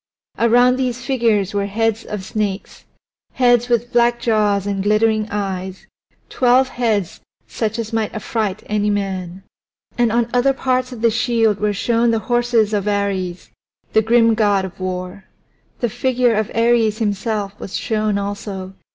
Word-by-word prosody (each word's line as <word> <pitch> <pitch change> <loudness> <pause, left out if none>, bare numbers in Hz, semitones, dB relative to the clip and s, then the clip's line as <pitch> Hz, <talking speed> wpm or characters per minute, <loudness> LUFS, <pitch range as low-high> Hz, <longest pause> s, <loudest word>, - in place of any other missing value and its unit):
Around 245 +2 +4
these 250 -1 -2
figures 225 -7 +1
were 200 0 -1
heads 225 +2 -1
of 210 -3 -5
snakes, 210 -2 -4 0.5
heads 245 -1 +3
with 240 0 0
black 240 0 +3
jaws 210 -4 +1
and 200 -1 -2
glittering 215 +1 +2
eyes, 190 -2 -4 0.4
twelve 255 +1 +3
heads 220 -8 -1 0.3
such 220 -1 -3
as 230 -1 -5
might 220 -2 -1
affright 215 -1 -3
any 210 0 0
man. 190 -2 -3 0.6
And 240 -2 +3
on 235 0 +1
other 250 +2 +3
parts 255 -1 -1
of 235 -2 -8
the 230 - +4
shield 225 -2 +1
were 210 0 +1
shown 230 +3 +1
the 230 - +2
horses 240 -2 +1
of 205 -1 -1
Ares, 195 -3 -2 0.4
the 220 - +5
grim 230 +1 +4
god 205 -3 +2
of 190 - -10
war. 185 +1 -5 0.6
The 240 - +1
figure 250 +1 +1
of 215 -1 -1
Ares 230 -2 +2
himself 205 -1 -2
was 195 - -5
shown 215 -4 -1
also. 200 -1 -5
220 Hz, 150 wpm, -19 LUFS, 200-235 Hz, 0.6 s, the